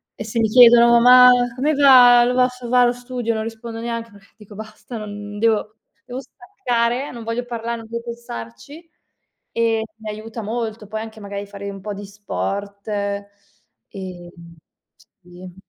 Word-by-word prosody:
E - - -6
se 220 +2 -5
mi 225 - +3
chiedono: 235 0 +7
"Ma 250 +1 +8 0.3
come 285 +4 0
va 250 -4 +7
lo 245 - 0
va 250 0 +4
s 250 -1 -10
va 250 0 +4
lo 240 - +2
studio?" 245 -1 -4
Non 220 - -3
rispondo 225 0 -7
neanche, 230 -1 -5
perché 200 -1 -20
dico: 210 -1 -15
"Basta, 220 +3 -9
non 205 -1 -8
devo 215 -1 +1 0.4
devo 250 0 -6
staccare, 265 - -3
non 235 -2 -9
voglio 230 +2 -3
parlare, 235 -1 -4
non 225 -1 -11
vo 235 0 -4
pensarci." 235 - -9 0.6
E 230 -1 0 0.2
mi 220 -1 -8
aiuta 220 +2 -7
molto. 220 -1 -4
Poi 215 +1 -5
anche 220 0 -9
magari 200 0 -6
fare 200 0 -9
un 195 -1 -9
po' 210 +1 -5
di 200 +1 -8
sport 200 0 -5
e, 200 -1 -3 1.1
mhmm, 170 -1 -15 0.7
sì. 180 0 -13
225 Hz, 170 wpm, -20 LUFS, 205-245 Hz, 1.1 s, Ma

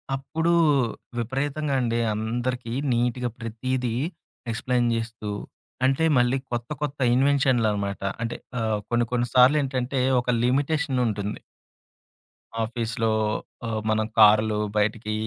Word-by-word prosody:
అప్పుడు 160 +5 -1 0.7
విపరీతంగా 135 +4 -1
అండి 115 -1 0
అందరికీ 120 +2 -3 0.2
నీట్‌‌గా 120 +1 0
ప్రతీదీ 120 +1 -2 0.6
ఎక్స్‌ప్లె‌యిన్ 120 +1 0
జేస్తూ 115 -2 -4 0.6
అంటే 135 +4 +2
మళ్ళీ 125 +2 +3
కొత్త, 120 -1 -3
కొత్త 145 -1 -3 0.2
ఇన్వెన్షన్‌లనమాట 120 -7 +2 0.2
అంటే 115 0 -2 0.2
ఆహ్, 110 -2 0
కొన్ని, 120 0 +2
కొన్ని 120 0 +1
సార్లేంటంటే 130 0 +3 0.2
ఒక 125 - -6
లిమిటేషనుంటుంది. 125 - 0 1.2
ఆఫీసు‌లో 115 0 -1 0.6
ఆహ్, 110 -1 -2
మనం 110 0 +2
కారు‌లో 110 0 +6 0.2
బయటికి 105 +1 0
120 Hz, 100 wpm, -25 LUFS, 110-130 Hz, 1.2 s, కారు‌లో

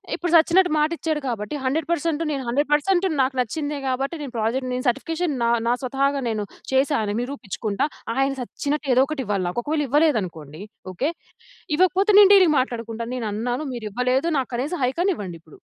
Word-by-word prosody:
ఇప్పుడు 350 -1 -3
సచ్చినట్టు 355 +3 +5
మాట 300 +1 +3
ఇచ్చాడు. 315 -2 -1
కాబట్టి 225 +2 -3
100% 290 +4 -1
పర్సెంటు 330 0 0
నేను 275 -2 -3
100% 285 +5 0
పర్సెంట్ 360 +5 +2 0.2
నాకు 265 0 0
నచ్చిందే, 290 +5 -2
కాబట్టి 270 +5 -1
నేను 275 -4 -7
ప్రాజెక్ట్ 250 +4 -1
నేను 255 +2 -3
సర్టిఫికేషన్ 325 +5 -1
నా 235 - +2 0.2
నా 240 - +3
స్వతహాగా 275 +2 0
నేను 215 -2 -2 0.3
చేశా 270 +2 +2
అని 205 -1 -2
నిరూపించుకుంటా. 220 -3 -3 0.3
ఆయన 270 0 +2
సచ్చినట్టు 285 +3 -3
ఏదోకటి 270 +2 +2
ఇవ్వాలి 200 -3 -1
నాకు. 180 - -2
ఒకవేళ 300 +2 0
ఇవ్వలేదు 295 -1 +3
అనుకోండి, 160 -1 -9 0.3
ఓకే. 265 - -1 0.7
ఇవ్వకపోతే 370 +4 +3
నేను 405 -1 +8
డీలింగ్ 365 -6 +6
మాట్లాడుకుంటాను. 230 -2 -4
నేను 230 - -3
అన్నాను. 245 +6 -2
మీరు 225 -3 -5
ఇవ్వలేదు. 250 +6 +1
నాకు 260 - -3
కనీసం 285 +8 -2
హైక్ 265 +7 -1
అన్న 385 -1 +2
ఇవ్వండి 180 -5 -6
ఇప్పుడు. 155 - -18
270 Hz, 180 wpm, -23 LUFS, 235-310 Hz, 0.7 s, నేను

